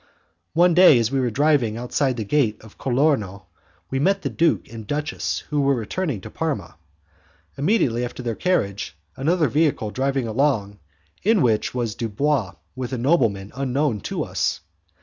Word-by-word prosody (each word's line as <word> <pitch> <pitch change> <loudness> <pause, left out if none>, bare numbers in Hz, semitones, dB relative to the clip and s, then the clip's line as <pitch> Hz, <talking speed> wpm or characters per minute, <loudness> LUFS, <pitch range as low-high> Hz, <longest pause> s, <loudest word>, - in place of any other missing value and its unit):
One 175 +1 +4
day 175 -6 +7
as 115 0 +1
we 135 - +1
were 125 -2 +1
driving 135 -4 +2
outside 125 +2 -1
the 110 - -2
Gate 110 -1 +1
of 110 - -16
Colorno, 120 -8 0 0.5
we 135 - 0
met 195 +7 +1
the - - -2
duke 165 -1 +1
and 110 -2 -8
duchess 150 +4 -2
who 145 -1 +2
were 140 0 +3
returning 125 - -3
to - - -10
Parma. 140 - -3 0.8
Immediately 140 - +1
after 125 +1 -5
their 120 -1 -1
carriage 100 - -1 0.2
another 160 +3 +1
vehicle 140 -5 +1
drove 135 +3 -1
along, 115 -4 0 0.4
in 210 -3 +3
which 115 0 +1
was 120 -4 -1
Dubois 115 0 -1 0.2
with 130 0 -5
a - - -1
nobleman 115 - +1
unknown 135 -2 0
to - - -3
us. - - -1
130 Hz, 160 wpm, -23 LUFS, 110-150 Hz, 0.8 s, day